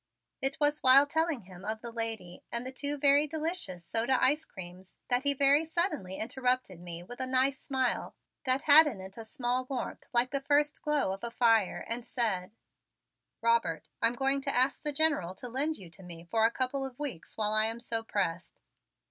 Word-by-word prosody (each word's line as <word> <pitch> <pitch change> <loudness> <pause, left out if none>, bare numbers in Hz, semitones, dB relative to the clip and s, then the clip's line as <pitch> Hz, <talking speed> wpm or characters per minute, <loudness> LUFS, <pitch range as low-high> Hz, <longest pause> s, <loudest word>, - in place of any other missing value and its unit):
It 270 +3 0
was 295 0 +2
while 265 +2 +7
telling 320 -2 -1
him 185 -1 -14
of 220 +1 -3
the 235 - -7
lady 225 -6 -3
and 235 +1 -1
the 260 - -5
two 285 +2 -1
very 285 +1 +4
delicious 310 - -3
soda 235 +3 +1
ice 300 +4 +2
creams 185 0 -11
that 250 +2 +1
he 285 0 +4
very 280 +3 +5
suddenly 320 - -2
interrupted 250 -4 -1
me 175 -1 -7
with 245 +7 -11
a 260 - 0
nice 260 +2 +2
smile 260 -3 -2 0.3
that 260 +3 +3
had 310 +1 +8
in 235 -9 -4
it 190 +1 -10
a - - -6
small 245 +3 -2
warmth 255 -2 -5
like 245 +1 +2
the 275 -1 -2
first 290 +1 +1
glow 295 -10 0
of 195 - -9
a 235 - -2
fire, 225 -4 +2
and 235 +1 -2
said: 215 -7 -1 0.9
"Robert, 225 -10 0
I'm 230 +1 +2
going 270 +2 +1
to 275 0 -2
ask 255 +2 +2
the 295 - -1
General 280 - +1
to 245 - -6
lend 285 +6 -1
you 180 -4 -12
to 190 - -12
me 170 -2 -11
for 225 -1 +3
a - - +5
couple 260 +2 -2
of 265 -2 -7
weeks 275 - -5
while 210 -1 0
I 215 0 +3
am 225 +1 -5
so 230 -1 -2
pressed. 185 -5 -3
250 Hz, 200 wpm, -30 LUFS, 215-280 Hz, 0.9 s, had